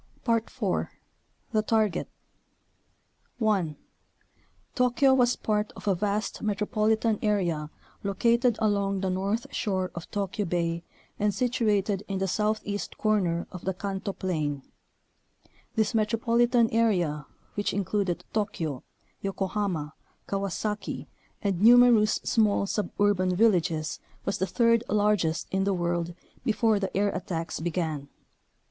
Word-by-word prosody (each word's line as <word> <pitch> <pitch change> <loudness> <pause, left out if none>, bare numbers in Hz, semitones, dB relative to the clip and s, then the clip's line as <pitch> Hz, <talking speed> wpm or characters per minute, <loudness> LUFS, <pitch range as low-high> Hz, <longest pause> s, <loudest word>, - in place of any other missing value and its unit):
IV. 230 -1 0 0.6
The 215 - +2
Target 215 -4 +1 1.3
1. 200 -9 +1 1.0
Tokyo 250 +1 +3
was 245 -2 +4
part 210 -1 -1
of - - -10
a 200 - +4
vast 205 +3 -2
metropolitan 215 +1 +1
area 175 -8 0 0.3
located 235 +4 +2
along 200 -3 +1
the 190 -1 0
north 200 +5 -1
shore 185 -4 -1
of 170 -1 -8
Tokyo 205 0 -2
Bay 170 -1 -1 0.4
and 205 -1 +1
situated 210 -5 +1
in 195 - -2
the 195 0 0
southeast 210 +1 -1
corner 185 -6 +1
of 180 -2 -8
the 190 -1 -1
Kanto 195 +1 -3
plain. 155 -8 -2 1.1
This 220 0 +1
metropolitan 230 +2 +3
area 175 -10 +1 0.3
which 205 - -1
included 195 -2 -1
Tokyo, 165 - -2 0.4
Yokohama, 195 -5 -2 0.3
Kawasaki, 200 +2 -3 0.4
and 195 -3 0
numerous 235 -1 +7
small 210 -3 +2
suburban 200 -2 +1
villages 170 -7 +2 0.3
was 195 - -1
the 190 - +1
third 230 0 +3
largest 205 -6 +2
in 190 0 +1
the 195 0 +1
world 170 -1 -1 0.3
before 220 -1 +2
the 195 -1 -1
air 205 +1 +3
attacks 165 -5 -4
be 170 +2 -1
gan. 155 -5 -3
200 Hz, 115 wpm, -27 LUFS, 180-220 Hz, 1.3 s, numerous